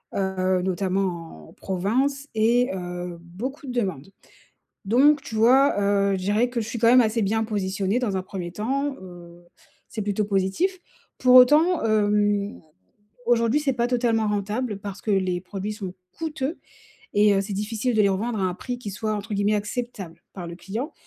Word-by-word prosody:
heu, 185 -1 0
notamment 180 - -2
en - - -16
province 255 +10 -1
et 235 +3 +3
heu, 180 -1 -5
beaucoup 255 - -7
de 250 - -4
demandes. 195 - -3 0.7
Donc, 275 +8 +4
tu 220 - -8
vois, 260 +6 +5
heu, 200 0 +2
je 190 - -1
dirais 205 +6 +1
que 245 -1 -2
je 220 - -4
suis 235 - -4
quand 230 - +2
même 250 +2 +7
assez 225 -1 +1
bien 220 +3 +1
positionnée 200 0 -1
dans 210 -6 -1
un 190 - -1
1er 185 -2 -6
temps, 270 +7 -2
heu, 175 -1 -13 0.4
c'est 220 - -4
plutôt 205 +1 -1
positif. 200 - 0 0.4
Pour 255 0 +4
autant, 300 +6 +6
hem, 205 -1 +1 0.7
aujourd'hui, 235 +3 +3
c'est 285 -2 +1
pas 240 -1 0
totalement 230 -3 +1
rentable 210 +2 -2
parce 200 -1 -7
que 220 - -2
les 185 -2 +1
produits 195 +3 -5
sont 195 -4 -6 0.2
coûteux 315 -1 -3 0.6
et 205 0 +5
heu, 195 - +2
c'est 200 +1 -5
difficile 220 +4 -2
de 215 - +5
les 200 - +4
revendre 215 +3 -1
à - - 0
un 185 - 0
prix 245 +3 -5
qui 220 -4 -7
soit 215 +2 -2
entre 210 +1 -4
guillemets 205 +1 +2
«acceptable» 205 -5 -5
par 180 -3 -7
le 170 - -7
client. 220 - -5
210 Hz, 180 wpm, -24 LUFS, 190-245 Hz, 0.7 s, même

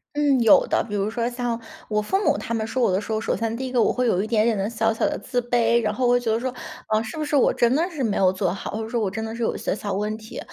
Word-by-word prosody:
嗯， 290 -3 +3
有 225 -3 +6
的。 - - +1
比 210 - -7
如 205 0 0
说 235 +1 -1
像 240 -1 -2 0.3
我 210 -1 +1
父 385 - 0
母 - - +2
他 - - -4
们 220 -1 -1
说 255 +2 -1
我 200 - +3
的 185 +2 +1
时 215 - -7
候， 215 - 0
首 220 - -1
先 225 0 -2
第 265 - -4
一 255 - -5
个 250 -2 +2
我 - - +3
会 250 - 0
有 190 -6 +2
一 210 - -3
点 220 -1 +2
点 230 -1 +2
的 195 +1 -1
小 225 -1 +1
小 225 - 0
的 300 - -3
自 245 - -2
卑。 235 -1 +2
然 215 -2 0
后 255 +3 -1
我 245 0 +4
觉 235 -2 -1
得 220 - +1
说， 255 +1 -3 0.3
啊， 215 0 +2
是 225 +6 -7
不 305 - -2
是 295 - -1
我 275 - +4
真 240 +1 +2
的 335 +5 +1
是 305 -7 -4
没 215 -4 0
有 185 -1 +4
做 185 -2 -1
好？ 195 - -6
或 220 +2 -3
者 220 - -7
说 235 -1 -1
我 205 - 0
真 220 +3 -4
的 220 0 -5
是 235 - -6
有 230 - 0
一 - - -4
些 - - -2
小 205 -1 -5
问 210 +2 -2
题。 220 0 -9
225 Hz, 370 characters per minute, -23 LUFS, 215-245 Hz, 0.3 s, 有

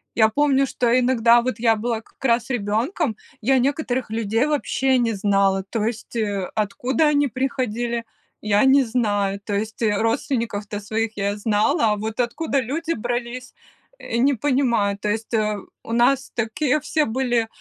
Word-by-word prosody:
Я 220 -1 +5
помню, 275 +2 +2
что 240 0 +1
иногда 240 -1 +4
вот 255 -2 -3
я 225 -1 +3
была, 225 +1 -2
как 230 - -22
раз 235 0 +2
ребенком, 235 - -1 0.3
я 260 +3 +3
некоторых 260 -3 -1
людей 225 +4 0
вообще 270 -3 +1
не 235 -2 +1
знала, 195 -1 +2
то 225 -3 -1
есть, 230 +1 -5
э, 205 -4 -1
откуда 235 +7 0
они 290 -1 +2
приходили, 240 -2 -2 0.4
я 210 -1 +2
не 270 0 +5
знаю. 205 -4 0
То 205 - -4
есть, 220 +3 -4
э, 210 -1 +2
родственников-то 225 -3 -1
своих 220 +1 -3
я 200 +1 -1
знала, 210 +1 +2
а - - -3
вот 220 +2 -5
откуда 275 +4 0
люди 325 +7 -2
брались, 245 +2 -4 0.5
э, 230 - -4
не 275 +4 +3
понимаю. 235 -6 +1
То 210 +1 -3
есть, 225 +2 -3
э, 215 -1 0 0.3
у - - -8
нас 260 +3 +2
такие 250 +5 0
все 305 0 0
были, 240 -1 0
235 Hz, 165 wpm, -22 LUFS, 215-260 Hz, 0.5 s, Я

